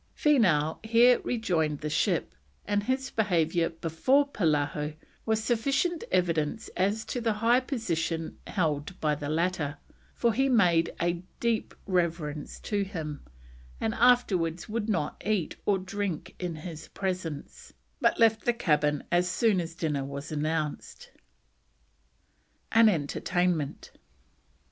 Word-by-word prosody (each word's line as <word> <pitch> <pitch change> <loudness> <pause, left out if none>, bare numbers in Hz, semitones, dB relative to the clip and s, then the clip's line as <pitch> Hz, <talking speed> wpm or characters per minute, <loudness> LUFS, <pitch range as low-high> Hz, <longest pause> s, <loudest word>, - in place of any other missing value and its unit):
Feenough 180 - +3
here 235 +2 +5
rejoined 165 -11 -1
the 150 - -2
ship, - - 0 0.3
and 205 0 +1
his 260 +5 -2
behaviour 170 -5 +1
before 170 - +1
Polaho 150 - 0 0.3
was 220 0 +1
sufficient 275 +9 0
evidence 175 +2 0
as 200 +4 0
to 245 - -3
the 225 -2 +1
high 230 +4 +3
position 170 - -2
held 160 -2 -1
by 150 -1 +1
the 145 0 -4
latter, 160 -3 -1 0.4
for 235 -2 +2
he 270 +5 +2
made 175 -9 +4
a 170 0 0 0.2
deep 235 -2 -1
reverence 170 -5 -2
to 205 -2 -1
him, 160 -7 -6 0.6
and 225 - -1
afterwards 200 -10 +2
would 225 0 -3
not 170 -8 -1
eat 205 -6 0
or 200 - +4
drink 185 -2 -4
in 175 -3 -3
his 160 0 -8
presence, 180 -6 -5 0.3
but - - +2
left 225 -1 +4
the 240 - +3
cabin 150 -9 +1
as 175 +1 +3
soon 200 0 +2
as 165 0 -7
dinner 150 -5 -1
was 140 +2 -6
announced. 155 0 -3 1.6
AN 225 -1 +7
ENTERTAINMENT. 170 -1 -1
180 Hz, 125 wpm, -28 LUFS, 155-220 Hz, 1.6 s, AN